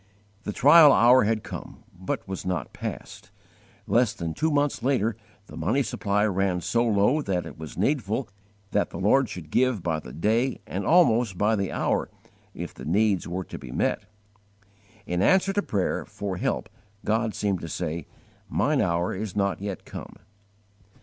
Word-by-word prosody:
The - - -2
trial 145 +6 +7
hour 125 -1 +6
had 110 0 0
come, - - -9
but 95 +2 -4
was 95 -1 -5
not 90 -6 -3
past. - - -7 0.6
Less 120 -2 +2
than 85 -6 -4
two 160 - 0
months 145 -3 +1
later 115 -4 +1 0.3
the - - -12
money - - +1
supply 105 +1 0
ran 95 -3 0
so 115 +6 +1
low 115 +6 +2
that 95 -8 -2
it - - -9
was 80 -1 -8
needful 115 +1 0 0.4
that 100 - +1
the - - -8
Lord 115 +6 +3
should 90 -7 -8
give 125 -7 +2
by 80 -2 0
the 65 - -11
day 110 - 0
and 95 +2 -4
almost 120 - +4
by 105 +3 +2
the 100 -2 -2
hour - - 0 0.5
if - - -6
the - - -11
needs 100 +3 +1
were 90 +2 -3
to - - -9
be 60 - -9
met. 100 - -1 1.0
In 90 -1 -1
answer 190 - +3
to 205 - +1
prayer 100 - -1
for 100 -3 -5
help - - -1 0.4
God 110 +1 0
seemed 100 -4 -1
to 85 - -6
say, 85 -1 -4 0.4
"Mine - - +1
hour 85 +1 0
is 100 0 -5
not 100 -1 0
yet 100 -3 -5
come." - - -9
105 Hz, 170 wpm, -26 LUFS, 90-120 Hz, 1.0 s, trial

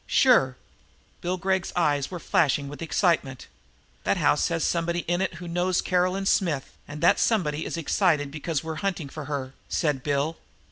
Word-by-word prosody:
"Sure." 135 - +4 0.6
Bill 180 +1 -1
Gregg's 190 0 0
eyes 145 -5 +1
were 180 - -5
flashing 150 -3 +1
with 145 +1 -8
the 165 - -4
excitement. 155 -7 0 0.6
"That - - +1
house - - +3
has 165 -1 -1
somebody 170 0 0
in 175 +2 -1
it 190 -2 -1
who 175 +1 -8
knows 175 +2 0
Caroline 185 +2 +1
Smith, 165 -9 0
and 145 +1 -8
that - - +5
somebody 160 -9 +1
is - - -4
excited 155 -3 +1
because 155 0 -3
we're 160 -1 -5
hunting 180 -7 -2
for 155 0 -7
her," 135 -2 -4 0.2
said 150 -5 0
Bill. 145 +3 -1
165 Hz, 175 wpm, -26 LUFS, 145-180 Hz, 0.6 s, that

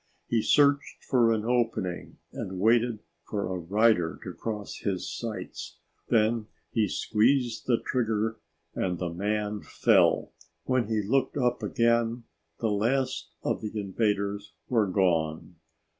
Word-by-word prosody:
He 115 -2 +1
searched 140 +3 +3
for 120 -3 +3
an 110 -1 0
opening 115 -7 -1 0.2
and 95 0 -5
waited 115 +1 +3 0.3
for 100 -2 -1
a - - -3
rider 95 -1 +2
to - - -6
cross 105 -3 -5
his 95 -4 -2
sights; 105 +6 -6 0.3
then 110 0 +2 0.2
he 110 -3 +2
squeezed 120 +5 +1
the 120 -2 +2
trigger 110 -3 0 0.3
and 90 -2 -1
the 85 -1 -3
man 105 +2 -1
fell. - - +3 0.3
When 130 -4 +1
he 110 -2 0
looked 130 +7 +1
up 125 -2 +1
again 115 -1 +1 0.4
the 110 -2 0
last 120 +6 0
of - - -1
the 105 0 -4
invaders 100 -2 -1
were 110 -5 +2
gone. 85 -3 0
110 Hz, 130 wpm, -28 LUFS, 100-115 Hz, 0.4 s, searched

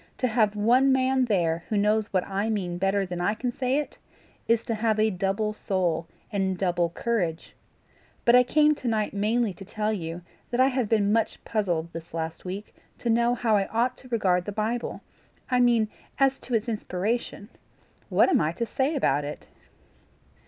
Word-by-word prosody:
"To 255 - +1
have 215 -3 +2
one 245 +6 +4
man 260 0 +2
there 170 -6 0
who 215 - 0
knows 210 +1 +1
what 185 -2 +1
I 200 +3 -2
mean 180 -5 -2
better 195 +1 +1
than 180 -1 -5
I 205 +4 +1
can 245 +2 -2
say 255 +2 0
it, 295 - -4 0.5
is 230 -1 +3
to 230 - -2
have 220 0 0
a 215 0 +3
double 195 +3 -1
soul 175 -6 -1 0.2
and 190 -2 0
double 175 -2 +1
courage. 170 -4 -2 0.7
But 235 - +6
I 250 - +8
came 300 +4 +4
to 270 -4 -6
night 215 -2 0
mainly 215 +1 +1
to 185 - -11
tell 215 +2 -2
you 170 -3 -5 0.3
that 240 - -2
I 260 +1 +6
have 255 -5 -1
been 210 -2 +2
much 225 -1 0
puzzled 175 -6 -1
this 165 0 -8
last 160 +1 -4
week 195 +3 -6 0.2
to 235 - -1
know 235 +1 +3
how 230 -2 +2
I 195 -1 +1
ought 245 +3 0
to 255 - -15
regard 185 -6 +1
the 205 - -4
Bible 220 +3 -2 0.5
I 250 - +3
mean 235 -3 +4 0.3
as 270 0 +2
to 245 - -3
its 225 +1 0
inspiration. 215 0 -3 0.6
What - - +4
am 370 - +3
I 155 +1 0
to 235 +7 -2
say 270 +6 -1
about 145 - +1
it?" 145 - -7
215 Hz, 190 wpm, -26 LUFS, 185-240 Hz, 0.7 s, I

